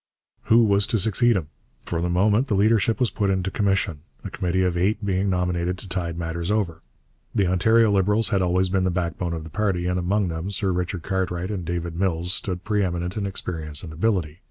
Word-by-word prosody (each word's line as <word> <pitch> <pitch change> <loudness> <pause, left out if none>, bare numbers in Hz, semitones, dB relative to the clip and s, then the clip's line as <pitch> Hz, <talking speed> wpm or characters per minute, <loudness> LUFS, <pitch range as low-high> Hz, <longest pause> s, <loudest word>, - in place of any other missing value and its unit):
Who 115 +1 +5
was 100 -2 +3
to 115 - +1
succeed 115 +3 +3
him? 80 -6 -2 0.3
For 85 - -3
the 90 - -1
moment 105 +8 +2
the 105 - +1
leadership 110 +1 +3
was 125 - +2
put 100 -2 0
into 95 0 0
commission, 95 -6 0 0.2
a - - -6
committee 95 +1 0
of 90 -1 0
eight 100 +4 0
being 95 0 0
nominated 90 -1 0
to 95 - -11
tide 85 -3 -3
matters 85 +1 -3
over. 100 -7 -1 0.5
The 100 - +3
Ontario 110 +5 +4
Liberals 105 +3 +2
had 95 - +1
always 90 +1 +2
been 95 0 +1
the 95 - +2
backbone 85 -1 -2
of 80 -1 -4
the 80 - -10
party, 100 -5 0
and 90 0 0
among 95 +2 0
them 80 +3 -4
Sir 100 -1 0
Richard 90 -1 -2
Cartwright 95 -1 -2
and 95 -4 -3
David 85 0 -3
Mills 90 -1 0
stood 90 -3 -3
pre 105 0 +1
eminent 90 0 -2
in 105 -2 -2
experience 80 -5 -3
and 80 -3 -8
ability. 85 -3 -1
95 Hz, 210 wpm, -24 LUFS, 85-100 Hz, 0.5 s, Who